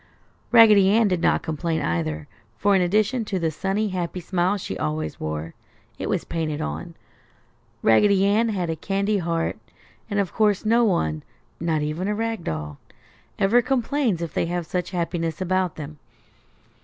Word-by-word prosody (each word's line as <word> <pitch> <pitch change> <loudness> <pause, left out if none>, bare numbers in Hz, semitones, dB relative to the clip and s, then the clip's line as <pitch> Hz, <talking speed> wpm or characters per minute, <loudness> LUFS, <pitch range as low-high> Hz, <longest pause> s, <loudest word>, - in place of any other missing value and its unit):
Raggedy 215 -5 +7
Ann 220 +2 +4
did 180 -3 0
not - - +2
complain 160 +1 -2
either, 80 -2 -2 0.3
for 200 0 +3
in 190 - +4
addition 215 +7 +1
to 195 - -2
the 165 -3 0
sunny, 195 +6 -1
happy 180 -1 -3
smile 180 +3 0
she 140 - -5
always 75 -1 -3
wore 80 +1 -4 0.5
(it - - -3
was - - 0
painted 155 -3 -3
on), 75 +2 -5 0.9
Raggedy 195 - +4
Ann 215 +3 +3
had 180 -6 -1
a - - -2
candy 200 +5 0
heart, 165 -1 -2 0.5
and 205 -1 0
of 195 -3 -1
course 210 -2 +2
no 230 +2 +4
one 80 - +1 0.4
(not 160 -2 0
even 155 +5 -2
a 210 - 0
rag 225 -3 -2
doll) 75 -2 -4 0.6
ever 225 +5 +4
complains 250 - 0
if 165 - -5
they - - 0
have 175 0 -2
such 180 +1 -3
happiness 170 -2 -2
about 185 -1 0
them. 150 -1 -8
180 Hz, 165 wpm, -24 LUFS, 155-205 Hz, 0.9 s, Raggedy